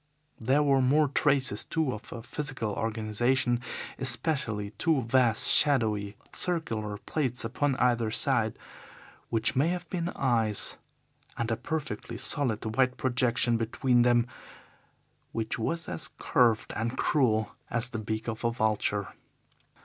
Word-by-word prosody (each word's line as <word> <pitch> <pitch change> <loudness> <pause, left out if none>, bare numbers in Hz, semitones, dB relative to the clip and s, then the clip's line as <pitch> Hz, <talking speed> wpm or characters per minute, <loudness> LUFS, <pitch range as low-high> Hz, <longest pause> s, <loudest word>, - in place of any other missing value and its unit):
There 135 +6 +2
were 135 -2 +3
more 145 +3 +3
traces, 135 -6 +1
too, 160 -6 -1
of 105 - -10
a 115 - -7
physical 130 -4 -4
organization, 115 +3 0 0.4
especially 120 -6 +1
two 135 +6 0
vast, 115 -1 +4
shadowy, 110 -8 +4 0.2
circular 115 - -2
plates 125 -1 -2
upon 135 +4 0
either 120 -3 +1
side, 115 - +1 0.7
which 115 -1 0
may 140 +5 +3
have 175 0 -3
been 175 -2 -2
eyes, 115 -6 +1 0.6
and 115 0 -2
a - - +2
perfectly 150 +5 -5
solid 125 -7 -1
white 130 0 +2
projection 120 -2 +1
between 120 +2 +1
them 120 -1 +3 1.1
which 110 0 -3
was 165 +8 -2
as - - -5
curved 120 -7 +2
and 115 +3 -3
cruel 110 -7 +1 0.2
as 120 +1 0
the 115 - -5
beak 110 +1 -4
of 110 0 -4
a 115 - +2
vulture. 110 -4 -1
120 Hz, 130 wpm, -28 LUFS, 110-135 Hz, 1.1 s, vast